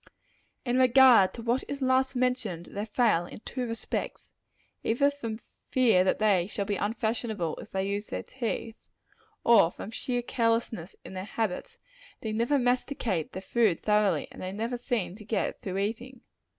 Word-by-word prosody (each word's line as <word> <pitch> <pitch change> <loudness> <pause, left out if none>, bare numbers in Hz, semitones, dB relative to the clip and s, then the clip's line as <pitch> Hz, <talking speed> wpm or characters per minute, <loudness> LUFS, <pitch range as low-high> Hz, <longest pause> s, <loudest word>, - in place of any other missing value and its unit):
In 250 +1 +1
regard 255 -5 +7
to 230 - -7
what 240 +3 +1
is 280 - -4
last 260 0 +2
mentioned, 245 -9 -1
they 205 +1 -3
fail 215 -6 +2
in - - -11
two 250 0 -4
respects. 230 0 -4 0.5
Either 280 +5 +3
through 230 -6 -5 0.3
fear 230 -8 +4
that 185 - +2
they 195 -5 +3
shall 200 -1 -3
be 205 0 -1
unfashionable, 220 -4 -2
if - - -10
they 190 0 -2
use 205 +1 -2
their - - -4
teeth, 230 -2 -4 0.7
or 210 -8 +6
from 195 - -8
sheer 245 +1 -2
carelessness 230 -7 -1
in - - -9
their 185 0 -5
habits, 225 - -3 0.4
they 220 - -3
never 235 +6 +2
masticate 245 - 0
their 190 - -6
food 220 -8 +2
thoroughly; 210 -2 +2
and - - -11
they 185 - -4
never 225 +5 -3
seem 240 -7 -2
to 215 - -11
get 215 +1 -2
through 190 -1 -4
eating. 235 +5 -3
225 Hz, 165 wpm, -28 LUFS, 200-245 Hz, 0.7 s, regard